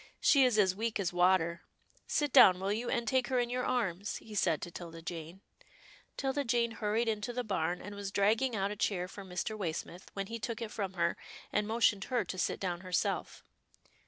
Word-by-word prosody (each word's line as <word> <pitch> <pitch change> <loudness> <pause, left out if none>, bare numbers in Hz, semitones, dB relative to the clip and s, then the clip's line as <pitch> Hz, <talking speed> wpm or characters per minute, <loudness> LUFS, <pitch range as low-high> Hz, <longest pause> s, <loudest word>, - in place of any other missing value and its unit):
She 275 -2 +5
is 250 -4 +3
as 190 -3 +4
weak 225 +1 -2
as 180 -3 -1
water 175 -1 +3 0.2
— - - -33
Sit 295 -3 0
down, 185 -1 +8
will 195 +2 0
you, 235 +3 -2
and 235 -3 -1
take 255 +1 +2
her 260 - 0
in 240 -1 +1
your 250 0 -1
arms," 205 -6 -1
he 220 - -9
said 165 -6 +2
to 175 - -6
'Tilda 165 -1 -9
Jane. 170 +2 -7 0.8
'Tilda 275 +1 0
Jane 235 -2 +1
hurried 225 +1 0
into 215 +1 -1
the 250 +1 -2
barn, 180 -5 -1
and 205 - -7
was 200 -1 -5
drag 205 +3 +3
ging 260 -3 0
out 200 0 0
a - - -4
chair 190 -3 0
for 200 +1 -9
Mr. 185 +3 -3
Waysmith, 175 -1 -5
when 195 0 -3
he 230 +3 -6
took 225 +1 -4
it 230 -2 -5
from 195 -3 -3
her, 170 -2 0 0.4
and 210 0 +1
motioned 220 -3 +2
her 250 -2 0
to 185 - -5
sit - - 0
down 175 -2 -2
herself. 185 -3 -2
205 Hz, 215 wpm, -32 LUFS, 180-235 Hz, 0.8 s, down